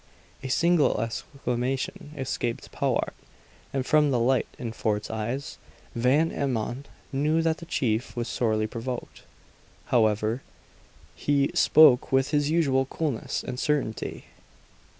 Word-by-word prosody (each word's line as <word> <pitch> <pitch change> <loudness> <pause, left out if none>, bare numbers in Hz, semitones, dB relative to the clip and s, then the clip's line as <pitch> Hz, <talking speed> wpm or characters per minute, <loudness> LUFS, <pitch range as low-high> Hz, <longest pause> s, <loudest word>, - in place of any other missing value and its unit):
A 135 - -5
single 165 -1 +3
exclamation 125 +4 -3
escaped 120 -3 -3
Powart, - - 0 0.6
and 135 -2 -2
from 150 0 +4
the 130 - +2
light 125 +2 +2
in 120 -5 -4
Fort's 110 -2 -2
eyes, 115 +5 -4 0.3
Van 135 +7 +2
Emmon 130 0 -2 0.3
knew 155 +4 +2
that 165 -1 +1
the 170 - -10
chief 115 -7 -1
was 120 0 -2
sorely 110 -3 0
provoked. 120 +2 -6 0.7
However, 110 +1 +2 0.7
he 140 -1 +1
spoke 145 -5 +6
with 135 +2 +2
his 145 -1 +2
usual 140 -5 +2
coolness 140 -3 -3
and 125 - -5
certainty. 145 -8 -2
130 Hz, 120 wpm, -26 LUFS, 115-145 Hz, 0.7 s, spoke